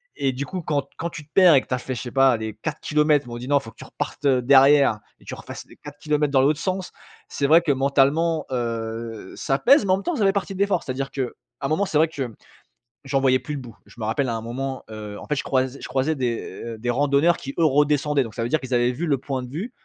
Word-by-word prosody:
et 135 -1 0
du 135 +3 -4
coup 185 +3 -5
quand 145 -3 -2
quand 170 - -3
tu 150 -3 -9
te 150 - -40
perds 180 -5 +7
et 135 - +5
que - - -18
tu - - -3
as - - +1
fait, 130 +1 -5
je 115 - -5
sais 120 - -7
pas, 135 0 +5
allez 110 -2 -4
4 155 0 -4
kilomètres, 150 -2 +2
ils - - -11
m'ont 120 - -6
dit: 125 +1 -7
«Non, 145 0 +4
faut 115 -4 -11
que - - -31
tu - - -10
repartes, - - -6
heu, 130 -3 +4
derrière 135 -2 +5 0.2
et - - -21
tu - - -7
refasses - - -9
les - - -18
4 145 0 -11
kilomètres 150 -1 0
dans 135 - +5
l'autre 145 +3 +2
sens», 185 +1 -3 0.4
c'est 140 - -1
vrai 160 +4 +6
que 165 -4 +1
mentalement, 140 +4 +2
heu, 115 -3 -4
ça 135 - 0
pèse, 270 -3 +5
mais 190 - +1
en - - +5
même 195 - -7
temps 350 - -1
ça 210 - +2
fait 195 - +4
partie 195 0 -2
de - - -8
l'effort. 200 -3 +1
C'est-à-dire 135 +1 -4
qu'à 135 - -2 0.4
un 135 - -1
moment 160 +6 +1
c'est 160 - -1
vrai 160 +1 +4
que 155 -3 -7
mmh, 120 -4 -7 0.7
j'en 135 0 0
voyais 130 -1 +3
plus 150 - -6
le 140 - -5
bout. 120 -3 -12
Je - - -18
me 110 - -3
rappelle 135 +5 0
à 115 - -1
un 110 - -4
moment, 130 +3 -5
heu, 105 -1 -7
en - - -11
fait 150 - 0
je 140 - -2
croise 130 0 0
je - - -6
croisais 135 +5 0
des, 120 -4 -1 0.2
heu, 115 -1 -6
des 120 +2 -3
randonneurs 145 +6 +3
qui 135 - -7
eux - - +4
redescendaient, 145 -1 +2
donc 115 -4 -9
ça 115 - -2
veut 115 - -2
dire 155 - +2
qu'ils 130 -1 -5
avaient 120 0 +3
vu 145 +8 -4
le 140 -3 +2
point 130 -1 -4
de 125 - -8
vue 180 - -5
140 Hz, 295 wpm, -23 LUFS, 125-150 Hz, 0.7 s, perds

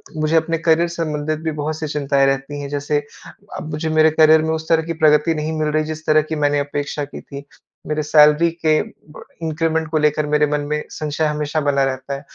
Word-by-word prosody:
मुझे 155 +1 0
अपने 165 +1 +1
करियर 165 +1 +2
संबंधित 155 -2 -3
भी 160 - -1
बहुत-सी 155 +1 -3
चिंताएँ 140 -2 +1
रहती 135 +2 -2
हैं, 140 - -6
जैसे 145 +1 -1 0.5
अब 155 - -7
मुझे 155 +1 -3
मेरे 155 - +6
करियर 155 0 +5
में 160 - -1
उस 160 0 -7
तरह 160 -1 +3
की 165 +1 -4
प्रगति 150 +2 +4
नहीं 155 +1 -3
मिल 155 - 0
रही, 155 +1 +1
जिस 155 0 -7
तरह 155 0 +4
की 160 - -2
मैंने 145 0 +2
अपेक्षा 145 +1 -3
की 145 - -10
थी। 140 0 -10 0.4
मेरे 155 0 -1
सैलरी 150 +2 +5
के 160 -2 +1 0.3
ब - - -11 0.2
इन्क्रिमेन्ट 160 0 -1
को 155 - 0
लेकर 150 0 +1
मेरे 150 0 +2
मन 150 0 0
में 150 0 -1
संशय 155 +1 -2
हमेशा 150 0 -1
बना 140 -1 +1
रहता 135 0 -3
है। 140 - -5
155 Hz, 215 wpm, -19 LUFS, 145-160 Hz, 0.5 s, मेरे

